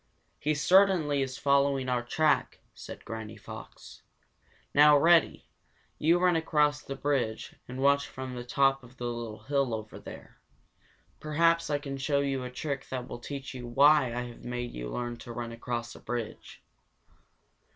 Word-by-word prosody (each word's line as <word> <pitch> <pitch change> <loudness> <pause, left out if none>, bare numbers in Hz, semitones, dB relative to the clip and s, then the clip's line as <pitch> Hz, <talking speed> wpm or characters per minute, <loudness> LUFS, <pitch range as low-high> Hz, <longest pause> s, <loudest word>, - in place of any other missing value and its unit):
"He 150 +1 0
certainly 170 -3 +4
is 130 -1 -3
following 140 -1 +2
our 125 -1 +1
track," 150 +6 +1
said - - -10
Granny 110 -1 -7
Fox. - - -11 0.7
"Now, 150 0 +7
Reddy, 165 +2 +4 0.5
you 165 +3 +4
run 180 -1 +3
across 150 -2 +2
the 135 - -6
bridge 130 -7 -1
and 125 +1 -7
watch 140 0 +3
from 130 -1 -7
the 120 -1 -5
top 135 +1 +2
of 125 +1 -16
the 120 - -5
little 120 -2 -5
hill 140 -4 0
over 110 -1 -8
there. - - -12 0.8
Perhaps 165 +2 +2
I 145 - +1
can 140 -1 -6
show 140 +1 +1
you 135 -2 -1
a 125 - -5
trick 140 +1 -5
that 125 -1 -4
will 120 - -7
teach 135 +2 -7
you 125 -2 -7
why 140 +3 +5
I 120 +1 -2
have 120 -1 -9
made 120 0 -4
you - - -5
learn 120 - -4
to 120 +1 -10
run 120 0 -5
across 120 0 -4
the - - -12
bridge." 120 -1 -6
135 Hz, 165 wpm, -29 LUFS, 120-145 Hz, 0.8 s, Now